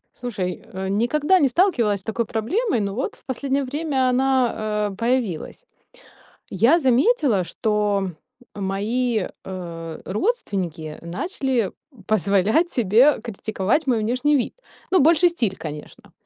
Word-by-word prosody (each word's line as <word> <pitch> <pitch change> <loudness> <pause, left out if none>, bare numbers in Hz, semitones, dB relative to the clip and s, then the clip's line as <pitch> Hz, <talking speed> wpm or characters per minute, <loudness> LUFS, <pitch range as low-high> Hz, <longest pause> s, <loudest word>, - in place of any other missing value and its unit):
Слушай, 205 -7 -4
э, 190 0 -4
никогда 290 - +2
не 285 - +3
сталкивалась 240 - +2
с - - -12
такой 225 +3 -2
проблемой, 245 - 0
но 200 -1 -2
вот 260 - -3
в - - -22
последнее 275 +1 -1
время 275 -1 0
она, 245 -5 +1
э, - - -11
появилась. 230 - -2 0.9
Я 235 - +4
заметила, 265 - +3
что 205 -1 0 0.4
мои, 210 +3 -1 0.2
э, 170 -3 -7
родственники 185 - -2
начали 240 - -2 0.3
позволять 215 - +2
себе 240 +5 +4
критиковать 220 +4 -1
мой 240 -4 +2
внешний 255 +7 +1
вид. 250 - -1 0.4
Ну, 375 - +4
больше 330 +4 +5
стиль, 230 - -1
конечно. 150 -2 -9
230 Hz, 120 wpm, -22 LUFS, 195-270 Hz, 0.9 s, больше